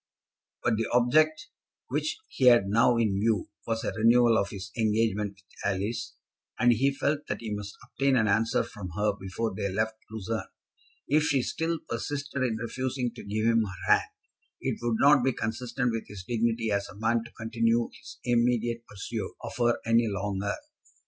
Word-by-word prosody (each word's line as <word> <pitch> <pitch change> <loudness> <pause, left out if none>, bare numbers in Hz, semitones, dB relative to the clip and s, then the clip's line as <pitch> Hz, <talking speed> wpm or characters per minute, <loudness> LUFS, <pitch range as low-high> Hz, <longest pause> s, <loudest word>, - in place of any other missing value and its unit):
But 115 -2 +2
the 115 - 0
object 155 +9 +3 0.4
which 310 - -1
he 130 - -1
had 120 -5 +7
now 115 +4 +4
in 105 -4 +1
view 110 -2 +1 0.2
was 115 0 -1
a - - -1
renewal 115 +2 +5
of 100 -2 +1
his 95 -2 -7
engagement 105 -2 +1
with 95 - -24 0.3
Alice, 110 +4 -3 0.4
and 120 0 +5
he 135 +5 +3
felt 145 +2 -1
that - - -3
he 110 -2 -4
must 105 -1 -6
obtain 135 -1 +1
an 110 -4 +3
answer 110 +3 +2
from 100 -5 -8
her 105 0 +2
before 100 +3 -3
they 100 +1 -2
left 110 +3 -1
Lucerne. 110 0 -4 0.6
If 150 +2 +3
she 140 -5 +2
still 165 +4 -1
persisted 140 +3 -3
in 120 -4 +1
refusing 125 +2 -2
to - - -10
give 110 +2 -2
him 115 0 +4
her 90 -5 +1
hand, - - +1 0.5
it - - -2
would 120 -1 0
not 140 -2 +6
be 130 0 +2
consistent 120 +3 -2
with 115 -1 -4
his 100 -3 -9
dignity 115 -1 0
as 100 0 0
a 105 - -12
man 115 +1 +1
to 120 - -12
continue 115 +1 +1
his - - -12
immediate 120 -1 +1
pursuit 100 -2 -5
of - - -6
her 120 -1 +3
any 115 0 +4
longer. 100 -1 -2
115 Hz, 180 wpm, -28 LUFS, 105-120 Hz, 0.6 s, had